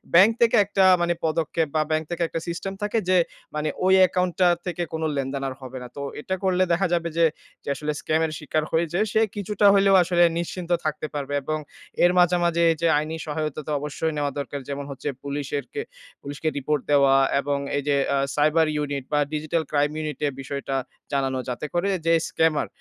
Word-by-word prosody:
Bank 195 +6 +8
থেকে 235 -1 +5
একটা 195 -1 +2 0.2
মানে 175 0 +2
পদক্ষেপ 160 0 0
বা 155 - +3
ব্যাংক 155 0 +1
থেকে 175 0 -4
একটা 165 - -4
সিস্টেম 175 +3 -4
থাকে 210 +2 +1
যে, 185 - +5 0.4
মানে 150 0 -1 0.2
ওই 190 - +5
অ্যাকাউন্ট 180 -1 +2
টা 180 - +6 0.2
থেকে 175 -1 -2
কোন 160 0 -2
লেনদেন 135 0 -2
আর 130 - -4
হবে 130 0 -8
না। 125 - -7
তো - - -4 0.2
এটা 190 - -2
করলে 185 -1 +3
দেখা 180 +3 +2
যাবে 170 -1 0
যে 170 - +5 0.4
যে - - -6
আসলে 150 +3 -3
scam 160 +1 +1
এর 160 - -3
শিকার 155 0 -1
হয়েছে, 170 +2 0
সে 220 - +3
কিছুটা 205 0 -1
হইলেও 195 0 +5
আসলে 175 0 +3 0.2
নিশ্চিন্ত 175 +1 -5
থাকতে 155 0 -2
পারবে। 145 -1 -4
এবং 155 +3 -1 0.5
এর 175 - +6
মাঝে, 175 0 +4
মাঝে 170 0 +2 0.2
যে 170 - +3
আইনি 155 +2 -2
সহায়তা 155 0 -3
তো - - -3
অবশ্যই 150 +2 -3
নেওয়া 145 -1 0
দরকার। 140 +1 -4
যেমন 140 0 -4
হচ্ছে 140 +2 -4
পুলিশের 140 0 -3
কে 435 - -2 0.4
পুলিশকে 145 +3 -5
রিপোর্ট 145 +1 0
দেওয়া 140 -2 +5 0.2
এবং 140 0 -1 0.2
এই 145 - -2
যে 145 - +3 0.2
আ - - +2 0.2
cyber 155 +2 +3 0.2
unit 140 -2 -3
বা 150 - +3
digital 155 +2 -1
crime 145 0 +1
unit 150 -3 -5
এ - - +1
বিষয়টা 135 0 -4 0.4
জানানো। 135 -1 0
যাতে 125 +4 -4
করে 175 +3 +1 0.2
যে 165 - +4
scammer 160 -2 +1
155 Hz, 200 wpm, -24 LUFS, 145-175 Hz, 0.5 s, ব্যাংক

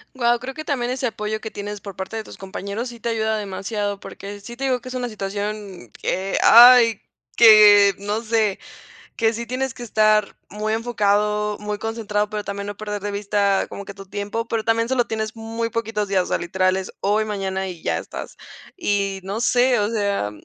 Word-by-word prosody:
Guau, 240 -1 +2
creo 265 +2 -6
que 310 - -6
también 250 -5 -1
ese 255 0 -2
apoyo 215 -1 -3
que 220 - -6
tienes 205 0 -6
por 200 -2 -9
parte 190 +4 -6
de 220 - -3
tus - - -12
compañeros, 200 +5 -5
sí 235 -1 -11
te 235 - -3
ayuda 220 -1 0
demasiado 205 0 -3
porque, 200 +1 -9
sí 235 +4 -10
te 270 - -6
digo 260 -2 +1
que 255 - -9
es 255 - -7
una 245 -1 -2
situación 200 - -5
que, 190 +1 -1
ay, 235 -2 +8 0.3
que, 210 -3 +8
no 205 +2 -2
sé. 220 -3 +1 0.6
Que 225 -1 +2
sí 235 +1 -5
tienes 255 +2 -3
que 245 - -8
estar 215 -2 +2
muy 215 +1 -2
enfocado, 210 -2 0
muy 210 0 -4
concentrado, 210 -2 -2
pero 210 -1 -3
también 200 0 -5
no 205 - -5
perder 210 0 -5
de 205 +1 -3
vista 200 -1 +1
como 200 - -8
que, 200 - -8
tu 195 0 -12
tiempo, 205 +3 -4
pero 225 -1 -1
también 230 +1 +1
sólo 255 -2 +2
tienes 220 0 -4
muy 225 +1 -4
poquitos 225 -2 -2
días, 190 -2 +2
o - - -8
sea, - - 0
literal 185 +2 +1
es 190 - -5
hoy, 210 +2 +2
mañana, 190 -2 -3
y 175 -3 -8
ya - - 0
estás. - - -8 0.4
Y 200 - -1
no 200 +3 -4
sé, 245 +1 +3
o 205 - +1
sea, 200 - -1
210 Hz, 205 wpm, -22 LUFS, 200-230 Hz, 0.6 s, ay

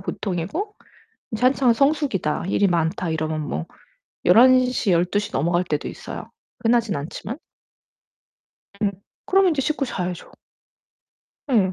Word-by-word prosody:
보통이고 200 - -3 0.6
이제 220 - -4
한창 255 -1 +4
성수기다 275 - +1
일이 200 - +3
많다 170 0 0
이러면 155 -1 -2
뭐 80 - -4 0.6
11:00 250 +1 +5
12:00 185 +5 +1
넘어갈 175 +4 +1
때도 150 -4 -2
있어요. - - -8 0.3
흔하진 230 -4 +2
않지만. 190 - -6 1.4
음 200 -1 +2 0.3
그럼 385 0 +4
인제 310 -5 +1
씻고 300 0 0
자야죠. 180 -7 -4 1.2
예. 195 -6 +3
200 Hz, 230 characters per minute, -23 LUFS, 170-255 Hz, 1.4 s, 11:00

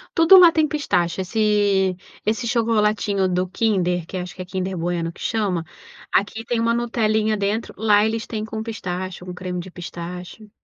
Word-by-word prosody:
Tudo 330 +3 +8
lá 350 -2 +9
tem 320 -1 +2
pistache, 190 - -1
esse 200 -2 +1 0.3
esse 225 +3 0
chocolatinho 210 -4 +1
do 180 0 0
Kinder, 180 -5 0
que - - -8
acho 180 0 -4
que 185 - -8
é - - -6
Kinder 185 0 -3
Bueno 170 0 -2
que - - -18
chama, 195 -7 -1 0.5
aqui 220 +3 0
tem 240 - -1
uma 230 0 +2
"nutelinha" 220 -2 +1
dentro, 205 +3 -2
lá 210 0 +4
eles 220 0 -2
têm 215 -2 -4
com 220 0 -5
pistache, 185 -5 -5
com 180 - -6
creme 180 0 -5
de 180 +2 -7
pistache. 180 +4 -8
205 Hz, 175 wpm, -22 LUFS, 180-225 Hz, 0.5 s, lá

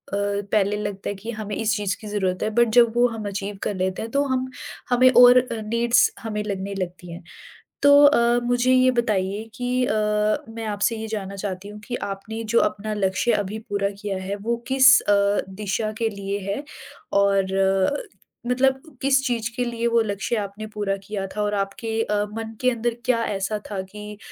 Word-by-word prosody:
पहले 200 0 0
लगता 200 -1 -4
है 205 - -3
कि 220 +5 -7
हमें 215 -2 -5
इस 225 0 0
चीज़ 200 -2 -1
की 215 - -8
ज़रूरत 190 -3 -1
है, - - 0
बट 235 +2 +3
जब 235 -2 +6
वो 245 +1 +5
हम 225 -3 -5
अचीव 200 0 -4
कर 205 - -2
लेते 185 0 -2
हैं 225 - -6
तो 280 +2 +2
हम 260 -1 -1 0.4
हमें 250 +1 +5
और 245 0 +8
अ, 235 -3 -4
नीड्स 235 +3 +3
हमें 210 -2 -4
लगने 200 -1 -4
लगती 175 -1 -6
हैं। 170 +1 -9 0.6
तो 285 - +6
अ, 240 -4 +5
मुझे 245 +1 +2
ये 255 0 +5
बताइए 210 -4 0
कि 250 +1 0
अ, 215 - 0 0.6
मैं 225 0 -7
आपसे 210 +2 0
ये 220 0 -5
जानना 200 -3 -5
चाहती 195 0 -5
हूँ 210 0 -10
कि 245 - -5 0.2
आपने 220 +3 -7
जो - - +6
अपना 215 +3 -6
लक्ष्य 195 +3 +1
अभी 205 +1 -1
पूरा 200 -1 0
किया 205 -2 -3
है 195 +2 -3
वो 230 +4 -2
किस 265 +1 +7
अ, 200 0 +2
दिशा 210 +2 -3
के 230 - +1
लिए 200 -1 -4
है 210 +9 -2 0.6
और 195 -1 +2
अ, 195 +6 +2 0.5
मतलब 265 +2 +2 0.2
किस 270 0 +3
चीज़ 235 -2 -1
के 250 - 0
लिए 235 -1 -2
वो 235 0 +3
लक्ष्य 205 +2 -2
आपने 205 0 -5
पूरा 205 -2 -1
किया 195 -1 -4
था 210 - 0
और 210 0 0
आपके 215 +3 -2
अ, 210 - -2 0.2
मन 225 0 -5
के 255 0 +3
अंदर 235 0 -2
क्या 230 -2 +2
ऐसा 200 +1 -2
था 195 - -3
कि 210 0 -9
210 Hz, 195 wpm, -23 LUFS, 200-235 Hz, 0.6 s, और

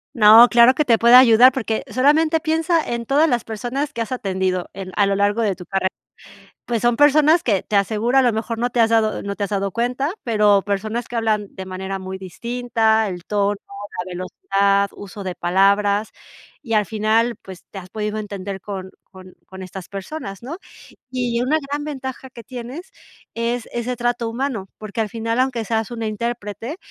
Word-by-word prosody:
No, 225 +1 +8
claro 240 +1 +6
que 300 - +1
te 230 -2 +4
puedo 235 +2 +7
ayudar 250 0 +7
porque 230 -4 -2
solamente 310 +5 +3
piensa 325 +1 +1
en 235 -1 -3
todas 290 +5 +3
las 245 -6 0
personas 245 +6 -4
que 235 - -8
has 230 +2 -2
atendido 190 -6 -2
en 185 -1 -8
a 205 - +3
lo 200 - +1
largo 205 +3 +1
de 200 -4 0
tu 180 - -10
carrera. 190 0 -1 0.8
Pues 235 -2 -2
son 240 0 +3
personas 300 +4 +5
que 200 -6 0
te 210 - -3
asegura 220 +6 +2
a - - +6
lo 245 -2 +3
mejor 225 +1 -3
no 245 +1 0
te 245 -1 -2
has 225 0 +4
dado 220 -1 +1
no 200 0 -4
te 205 - -3
has - - -9
dado 200 -1 -1
cuenta, 250 - -1
pero 210 -4 +3
personas 215 +4 -3
que 240 - -8
hablan 215 -3 0
de 190 - -7
manera 190 +1 -5
muy 190 0 -7
distinta, 225 +2 0
el 180 -2 -7
tono, 205 0 0
la 200 -2 -7
velocidad, 195 +2 0
uso 200 0 -9
de 185 - -4
palabras 200 +4 +2 0.5
y 230 -5 -5
al 210 -1 +3
final 220 +2 +1
pues 190 -2 -11
te 195 - -7
has 185 - -13
podido 210 +1 -3
entender 200 -2 -6
con 190 -2 -7
con 185 -1 -15
con 190 0 -9
estas 185 -1 -9
personas, 195 0 -7
¿no? 300 +7 -6 0.5
Y 245 -2 -1
una 285 +5 +2
gran 290 +1 -3
ventaja 265 -3 -6
que 235 -2 -12
tienes 255 - -8 0.4
es 235 +1 -2
ese 240 +1 -2
trato 240 -1 -1
humano, 230 -5 -3
porque 215 +1 -4
al 215 - -2
final, 230 +2 -2
aunque 255 -3 0
seas 220 0 -1
una 230 -2 -5
intérprete, 225 - -4
225 Hz, 195 wpm, -21 LUFS, 200-245 Hz, 0.8 s, No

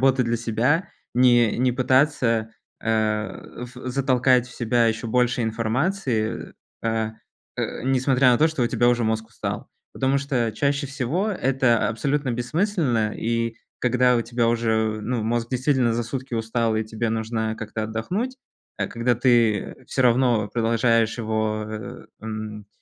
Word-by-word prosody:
работы 130 -1 +4
для 115 0 0
себя, 120 - 0 0.2
не 120 -3 +4
не 125 -1 +2
пытаться 130 -3 +2 0.3
э, 110 +1 -2
в 125 +1 -7
затолкать 130 -1 +3
в 125 - -13
себя 120 0 +2
еще 115 +1 -1
больше 125 +1 +2
информации, 115 - -1 0.3
э, 110 -1 -1 0.5
а, - - +1 0.2
несмотря 130 -1 +3
на 120 - +3
то, 160 - +5
что 155 -6 -2
у - - +3
тебя 120 - +2
уже 120 -1 +2
мозг 110 0 -1
устал. 115 - -5 0.3
Потому 135 +1 +1
что 125 -5 -1
чаще 140 +2 0
всего- 140 - -1
это 130 - +2
абсолютно 140 +3 -1
бессмысленно 125 - 0
и 115 0 -1 0.2
когда 125 0 +3
у 115 - +1
тебя 120 -1 0
уже, 110 -2 +1
ну, 120 0 -2
мозг 115 +1 -1
действительно 130 -2 +2
за 120 - 0
сутки 130 +2 -6
устал, 115 0 0
и 110 - +1
тебе 110 +1 -3
нужно 110 0 -2
как-то 110 0 -5
отдохнуть, 185 - -3 0.4
а, - - 0
когда 120 +1 0
ты 120 -1 +2
всё 130 - 0
равно 120 -3 +3
продолжаешь 115 0 +1
его, 110 -1 -1
э, 110 -2 -7 0.2
м, 110 -1 -6
120 Hz, 150 wpm, -23 LUFS, 110-130 Hz, 0.5 s, то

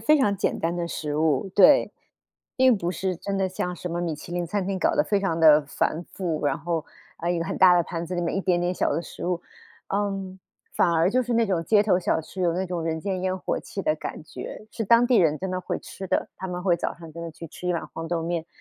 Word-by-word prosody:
非 300 +7 +4
常 205 -7 +3
简 200 - -1
单 165 +1 -1
的 175 -1 -2
食 150 -3 -3
物。 155 +3 +1
对， 190 - +6 0.6
并 260 -2 +5
不 175 -3 -2
是 185 +1 -2
真 195 +3 -4
的 190 - +1
像 180 -1 -3
什 180 - -5
么 170 +1 -2
米 170 -2 -1
其 155 +3 -10
林 175 0 -1
餐 190 +2 -2
厅 195 -1 -1
搞 - - +2
得 295 - +3
非 205 -2 +1
常 190 -4 -1
地 155 -2 +7
繁 155 +3 -1
复， 165 -6 -2
然 135 - 0
后， 165 0 -2 0.3
哎， 170 +1 -1
一 175 - 0
个 165 - -1
很 - - -4
大 180 -1 +8
的 175 - +4
盘 170 0 -5
子 180 - -4
里 175 - -1
面 170 - -1
一 195 - 0
点 180 -2 +2
点 175 +1 0
小 - - 0
的 165 - -1
食 175 - -7
物。 175 -1 -1 0.5
嗯， 195 -2 -2 0.3
反 175 - +3
而 170 +2 +3
就 255 +2 +2
是 245 0 -2
那 230 0 +4
种 180 -4 0
街 205 +4 +4
头 190 -4 +3
小 175 - +1
吃， 175 +4 -7
有 170 -2 +2
那 185 - -1
种 175 -2 -3
人 160 0 -1
间 190 +1 -3
烟 185 0 -1
火 - - -2
气 195 - -6
的 155 - +2
感 155 - -6
觉， 215 - -8
是 - - -4
当 235 +3 +5
地 245 -2 +4
人 155 -5 +3
真 190 0 -3
的 185 0 -2
会 - - -3
吃 190 - -8
的， - - 0
他 190 - -5
们 180 0 -4
会 180 -3 +3
早 - - -3
上 165 -2 -12
真 170 +1 -7
的 165 - -5
去 165 +1 -9
吃 180 +3 -7
一 - - +2
碗 165 - -3
黄 165 0 -5
豆 170 -1 -1
面。 170 -1 -2
180 Hz, 295 characters per minute, -25 LUFS, 165-195 Hz, 0.6 s, 大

